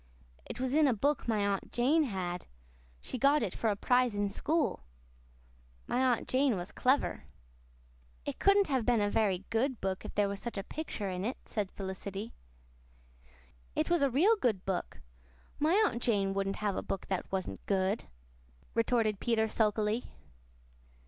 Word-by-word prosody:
"It - - -7
was 260 0 -1
in 305 0 +5
a 250 - +2
book 285 +7 0
my 215 -3 +1
Aunt 200 -1 -2
Jane 295 +6 +3
had. 180 -6 -4 0.5
She 255 - -5
got 280 +3 +4
it 195 - -2
for 225 - 0
a 205 - +1
prize 245 +1 +2
in 205 0 0
school. 310 +8 0 1.0
My - - -1
Aunt 255 -3 +2
Jane 260 -4 +2
was 175 +1 -6
clever." 265 +3 +1 1.0
"It - - -4
couldn't 395 0 +5
have 265 -4 +1
been 240 -1 +3
a 205 0 +1
very 200 -3 +1
good 245 +2 0
book 190 -1 -2
if - - -8
there 205 -1 +3
was 200 0 -4
such 235 -1 -6
a 195 - -2
picture 215 -8 -4
in 180 0 -3
it," 240 +6 -2
said 205 -3 -2
Felicity. 195 +3 -6 1.4
"It - - 0
was 345 -3 +3
a 280 - +4
real 345 - +4
good 215 - 0
book. 190 -2 -3 0.6
My 315 +5 +3
Aunt 235 - -1
Jane 200 -5 +1
wouldn't 195 0 -1
have 200 -2 +1
a - - -1
book 195 - -4
that 190 -2 -3
wasn't 185 - -3
good," 190 - +1 0.7
retorted 225 -3 +1
Peter 225 -1 +1
sulkily. 215 +1 0
220 Hz, 170 wpm, -32 LUFS, 195-260 Hz, 1.4 s, in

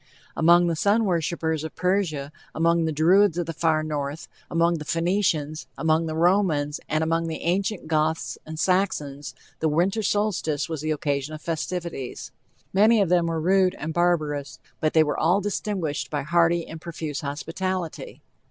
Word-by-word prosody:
Among 175 +2 +5
the 170 -1 0
sun 205 +7 +2
worshipers 165 -3 -1
of 160 - -7
Persia, 165 -6 0 0.2
among 170 0 +2
the 160 - 0
Druids 175 +4 +4
of 175 - -1
the 165 - -4
far 155 -1 +1
north, 150 0 -4 0.2
among 170 0 +2
the - - -5
Phoenicians, 165 -3 0
among 160 0 +1
the 155 - -3
Romans, 165 -4 +2
and 155 +1 +1
among 165 +1 0
the 160 -1 -5
ancient 190 +1 -1
Goths 160 0 0
and 155 0 -8
Saxons 145 -8 -1 0.2
the 160 - +1
winter 185 +8 +1
solstice 200 -8 0
was 160 -3 -4
the 155 - -3
occasion 145 -1 -1
of 155 - -10
festivities. 170 -4 -4 0.4
Many 215 +4 +5
of 195 -4 +2
them 175 -1 +3
were 165 -1 -1
rude 185 +2 +3
and 155 +2 -4
barbarous, 150 -6 0 0.2
but 155 - 0
they 160 - +6
were 150 - -2
all 175 +5 +3
distinguished 195 -6 -2
by 145 -2 -2
hearty 170 +2 +2
and 160 -1 -9
profuse 160 -4 -5
hospitality. 165 +4 -4
165 Hz, 165 wpm, -25 LUFS, 155-180 Hz, 0.4 s, they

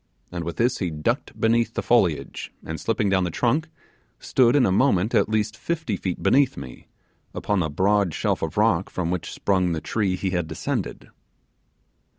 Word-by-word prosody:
and 85 -1 -4
with 85 0 -4
this 120 +2 +1
he 90 - -1
ducked 75 -1 -2
beneath 115 0 +2
the - - -2
foliage, 95 -11 +1
and 80 0 -5
slipping 110 -2 0
down 95 -1 +2
the 90 - -1
trunk, 130 - 0 0.5
stood 125 -1 +3
in 135 -4 +5
a - - +2
moment 105 -1 +2
at - - +3
least 110 0 0
fifty 160 -10 -2
feet 90 -2 -4
beneath 135 +7 +3
me, 65 - -9 0.5
upon 105 -2 0
the 80 -3 0
broad 95 +4 +2
shelf - - -1
of - - -4
rock - - +2
from 85 -2 -2
which 90 -2 -3
sprung 90 -3 +1
the 80 - -2
tree 95 +2 -1
he 95 0 -2
had 90 -3 -1
descended. - - -4
100 Hz, 180 wpm, -24 LUFS, 90-115 Hz, 0.5 s, in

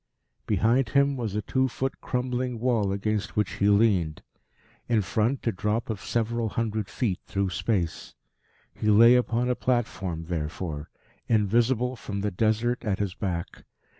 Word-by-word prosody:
Behind 115 +5 +2
him 140 +1 +3
was 115 -6 -3
a 105 - -1
two 130 0 +1
foot 130 +1 -3
crumbling 125 -1 -2
wall 115 -5 +1
against 105 +1 -2
which 105 -4 +1
he 100 - +3
leaned; 100 -7 +2 0.7
in 110 -3 +3
front 115 +7 0
a 115 - +2
drop 105 +4 -1
of 105 -3 -5
several 115 0 -1
hundred 110 -3 -2
feet 100 -8 -1
through 100 -1 -1
space. 85 +1 -2 0.6
He 110 - -3
lay 115 +3 +8
upon 125 -1 +2
a 125 - +2
platform, 95 -10 -1
therefore, 80 -2 -4 0.4
invisible 120 +4 +2
from 100 -4 -5
the 105 0 -1
Desert 110 +6 0
at 105 -5 0
his 100 -3 -2
back. 90 -2 -4
110 Hz, 150 wpm, -26 LUFS, 100-120 Hz, 0.7 s, lay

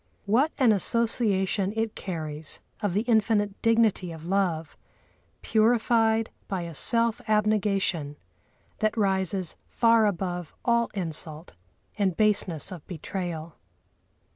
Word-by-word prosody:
What 250 +10 +3
an 255 -5 +5
association 205 -2 +1
it 225 -1 -1
carries 155 -4 -5 0.2
of 200 -4 -1
the 205 - +3
infinite 215 -3 +1
dignity 225 -6 +2
of 160 -1 -9
love, 175 -4 -1 0.7
purified 225 0 +2 0.2
by 190 -3 -3
a 170 -1 -7
self 230 - +2
abnegation 200 -8 +1 0.6
that 215 +1 0
rises 190 -3 0
far 230 -2 +4
above 180 -3 -3
all 235 -1 +2
insult 160 -3 -5 0.5
and 190 -4 +1
baseness 200 -8 +1
of 175 -5 -8
betrayal! 170 -2 -5
200 Hz, 110 wpm, -26 LUFS, 175-220 Hz, 0.7 s, an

